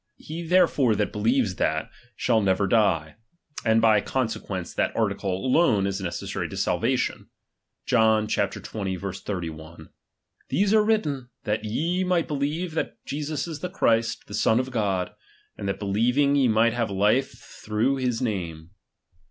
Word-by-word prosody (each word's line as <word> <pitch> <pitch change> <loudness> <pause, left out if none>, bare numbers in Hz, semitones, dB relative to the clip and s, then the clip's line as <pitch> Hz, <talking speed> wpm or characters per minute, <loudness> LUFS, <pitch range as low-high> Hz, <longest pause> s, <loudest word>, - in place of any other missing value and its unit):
He 160 +2 -7
therefore 165 -9 +3
that 105 0 0
believes 110 -2 +1
that, 80 0 -1 0.2
shall 115 -3 +2
never 100 0 +2
die; 95 -6 +1 0.5
and 110 -1 +4
by 110 -2 +4
conse 115 -2 -1
quence, 90 -3 -5
that - - 0
article 95 +2 -1
alone 125 - +3
is 100 0 -2
necessary 85 -2 -4
to - - -7
salvation. - - 0 0.6
John 110 -2 +3
XX. - - -1 0.7
3 90 -5 -2
1: 80 +1 -12 0.6
These 205 +2 +2
are 215 -1 +5
written, 150 - 0
that 105 +1 -1
ye 165 - 0
rnight 180 -2 +1
be - - -2
lieve 155 +5 -2
that 160 - -2
Jesus 150 +2 -3
is 160 -3 -6
the 180 - -4
Christ, 115 -9 +1
the 100 - -11
Son 110 +2 +3
o/' - - +1
God; 100 -6 -1 0.4
and 100 - -5
that 95 - -1
believing, 120 +8 +2
ye 135 -3 +4
viight 115 +1 +3
have 120 -2 -1
life 105 +7 +2
thj'ongh 120 +6 -2
his 125 -2 0
nnme. 85 -8 -3
115 Hz, 155 wpm, -25 LUFS, 100-140 Hz, 0.7 s, are